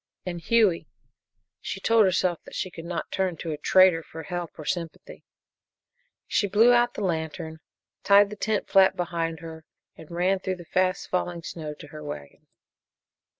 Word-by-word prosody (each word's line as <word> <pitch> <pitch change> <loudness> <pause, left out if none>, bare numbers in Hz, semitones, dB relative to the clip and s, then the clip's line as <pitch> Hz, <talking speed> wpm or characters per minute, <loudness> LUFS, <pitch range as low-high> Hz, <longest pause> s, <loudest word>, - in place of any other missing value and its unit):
And 175 -2 -4
Hughie! 210 -2 +2 0.7
She - - -5
told 225 -2 +4
herself 185 -2 +1
that - - -11
she 185 - -3
could 165 -1 -9
not 170 0 -4
turn 185 -3 -1
to 165 - -5
a 150 - -3
traitor 185 0 +5
for 160 0 -10
help 175 +1 -4
or 155 - -8
sympathy. 170 -2 -5 1.0
She 205 - +1
blew 225 +5 +5
out 240 0 +3
the 210 - -3
lantern, 160 -2 -3 0.4
tied 200 0 +6
the - - -5
tent 210 0 -1
flap 190 -1 +5
behind 165 -3 -3
her, 160 -1 -9 0.3
and 160 - -13
ran 180 +3 +1
through 185 0 -3
the 175 -1 -12
fast 185 +2 0
falling 175 -2 -2
snow 155 -3 -6
to - - -12
her 155 -1 -9
wagon. 75 - -9
175 Hz, 170 wpm, -26 LUFS, 165-190 Hz, 1.0 s, tied